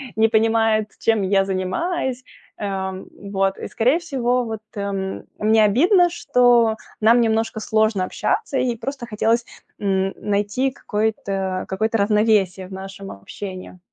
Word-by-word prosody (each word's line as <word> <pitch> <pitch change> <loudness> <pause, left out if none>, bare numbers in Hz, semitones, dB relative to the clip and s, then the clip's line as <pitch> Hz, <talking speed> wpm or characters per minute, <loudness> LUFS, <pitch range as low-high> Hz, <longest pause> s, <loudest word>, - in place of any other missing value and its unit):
не 220 +1 +4
понимает, 225 -1 +2
чем 225 -3 +2
я 195 0 +2
занимаюсь. 250 - -2 0.3
Ам, 190 -2 -4 0.3
вот. 195 0 +1
И - - -6
скорее 255 +8 +2
всего, 250 -7 0
вот, 220 -2 -5
эм, 195 -1 -3 0.2
мне 215 0 +4
обидно, 350 - +4
что 245 -8 +3 0.3
нам 230 +3 +5
немножко 225 -1 0
сложно 215 -3 +1
общаться, 280 - -1
и 245 -2 0
просто 240 +1 -6
хотелось 230 +2 +1 0.4
н 195 -1 0
найти 205 +6 0
какое-то 200 -5 -2
какое-то 220 +4 0
равновесие 200 -3 +2
в 190 - -11
нашем 195 +1 -8
общении. 185 - -9
215 Hz, 130 wpm, -21 LUFS, 195-235 Hz, 0.4 s, нам